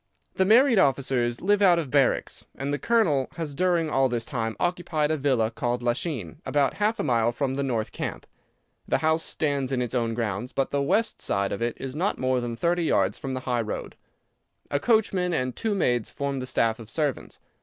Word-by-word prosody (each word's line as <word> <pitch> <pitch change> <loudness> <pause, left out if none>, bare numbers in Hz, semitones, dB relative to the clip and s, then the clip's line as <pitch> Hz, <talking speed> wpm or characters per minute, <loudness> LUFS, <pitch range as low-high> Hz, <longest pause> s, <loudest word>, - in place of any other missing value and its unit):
The 190 - +2
married 235 +2 +5
officers 130 -5 +1
live 205 +2 +2
out 180 -3 +6
of 155 -6 -3
barracks, 140 -3 +1
and 140 +2 -3
the 145 - -1
Colonel 170 - +2
has 160 -3 -4
during 175 +1 +1
all 135 -3 +2
this 120 -1 -1
time 115 -6 -3
occupied 175 -4 0
a - - +2
villa 130 -6 +1
called 120 +1 -2
Lachine, 120 - -2
about 140 -2 +1
half 220 +2 +1
a - - 0
mile 120 -4 +2
from 130 +2 -2
the 140 - -2
north 120 -5 -1
camp. - - -5 0.6
The - - +2
house 160 +1 +1
stands 140 -5 -1
in 130 - 0
its 125 -2 -2
own 115 -2 0
grounds, 115 +1 -3
but 135 - -1
the 140 - +1
west 215 +10 0
side 100 0 -1
of 100 - -4
it 120 0 -1
is 135 0 -5
not 185 +6 0
more 130 -1 0
than 120 -1 -4
thirty 170 +6 0
yards 100 -8 +1
from 135 -1 -4
the 130 - -3
high 125 -2 0
road. 110 - -5 0.8
A 145 - +1
coachman 190 -3 +2
and 130 -3 -1
two 220 -3 -1
maids 120 - +1
form 140 -1 -3
the 130 - -5
staff 115 -3 +1
of 115 -2 -11
servants. 145 0 -2
135 Hz, 210 wpm, -26 LUFS, 120-165 Hz, 0.8 s, out